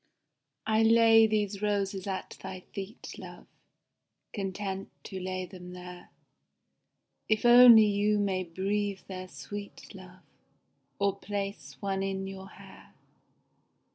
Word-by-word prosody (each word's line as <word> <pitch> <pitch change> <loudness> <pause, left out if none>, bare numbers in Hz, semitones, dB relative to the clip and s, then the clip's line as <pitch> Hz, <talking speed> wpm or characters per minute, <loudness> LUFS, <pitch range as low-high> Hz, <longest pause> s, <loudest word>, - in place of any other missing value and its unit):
I 220 0 +2
lay 225 0 +6
these 210 -2 -1
roses 200 -2 -1
at 190 -1 -5
thy 190 -1 -7
feet, 200 +4 -7
love, - - -11 0.9
Content 195 -1 -4
to 190 -2 -7
lay 185 0 -4
them 180 -1 -11
there 180 0 -10 1.2
If 215 +1 +1
only 240 -2 +9
you 210 +1 +1
may 195 -2 0
breathe 195 +3 -2
their 185 -1 -7
sweet, 205 +2 -9
love, 185 -1 -13 0.7
Or 200 0 0
place 200 -1 -5
one 195 -1 -1
in 195 0 -2
your 195 0 -8
hair. - - -16
195 Hz, 115 wpm, -29 LUFS, 190-210 Hz, 1.2 s, only